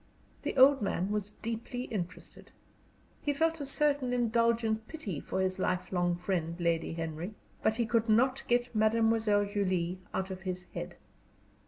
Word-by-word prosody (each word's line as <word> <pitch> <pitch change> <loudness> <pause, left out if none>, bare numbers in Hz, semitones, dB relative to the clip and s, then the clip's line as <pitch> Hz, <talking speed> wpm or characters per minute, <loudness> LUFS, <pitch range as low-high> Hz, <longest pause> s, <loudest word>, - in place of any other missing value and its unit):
The - - -3
old 270 +1 +7
man 195 -1 -1
was 210 -1 -1
deeply 230 +2 -3
interested. 180 -7 -6 0.7
He 290 - 0
felt 325 +1 +1
a 280 - -4
certain 280 -3 +1
indulgent 230 -2 +1
pity 205 - -5
for 190 - -2
his 190 0 0
lifelong 180 -1 0
friend 175 -2 -2
Lady 170 -1 0
Henry; 165 +4 -4 0.3
but 220 - +2
he 235 0 +1
could 225 0 +1
not 255 +4 +4
get 245 0 +1
Mademoiselle 220 -1 +3
Julie 185 -3 -1
out 190 0 -2
of 185 0 -6
his 185 -1 -4
head. - - -5
215 Hz, 150 wpm, -31 LUFS, 185-240 Hz, 0.7 s, old